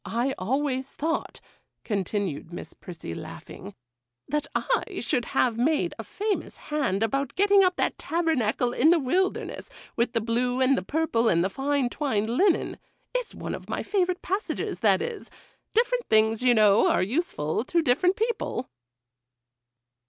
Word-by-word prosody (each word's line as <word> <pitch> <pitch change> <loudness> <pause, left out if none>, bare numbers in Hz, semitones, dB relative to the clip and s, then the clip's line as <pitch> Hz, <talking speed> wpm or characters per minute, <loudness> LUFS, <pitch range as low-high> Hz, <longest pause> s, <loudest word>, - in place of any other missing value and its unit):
I 245 +4 -1
always 265 +5 -1
thought,' 325 +2 -2 0.4
continued 195 -5 -2
Miss 175 - -8
Prissy, 165 - -8
laughing, 100 - -9 0.5
'that 295 +1 -1
I - - -1
should 250 -5 -1
have 235 -2 +1
made 300 +5 +1
a - - -4
famous 420 0 -3
hand 265 -10 -1
about 275 +4 -1
getting 400 0 +5
up 365 -1 +2
that - - -1
tabernacle 255 -8 0
in 295 +6 +4
the 345 - +6
wilderness, 360 +7 -1 0.3
with 235 0 0
the 230 - +2
blue 245 +3 0
and 260 +1 +4
the - - -1
purple 285 -8 +1
and 170 +1 +3
fine 275 +2 0
twined 230 -5 -1
linen; 360 +8 +2 0.3
it's - - -3
one - - -5
of - - -8
my - - -2
favourite 365 -3 0
passages, 390 +4 -2
that - - +3
is;—different 480 +1 -3
things, 220 +1 +3
you 250 -1 +4
know, 215 -1 +5
are - - +2
useful 210 - -1
to 335 +3 +1
different 355 +9 +3
people. 435 - -2
265 Hz, 145 wpm, -26 LUFS, 225-345 Hz, 0.5 s, the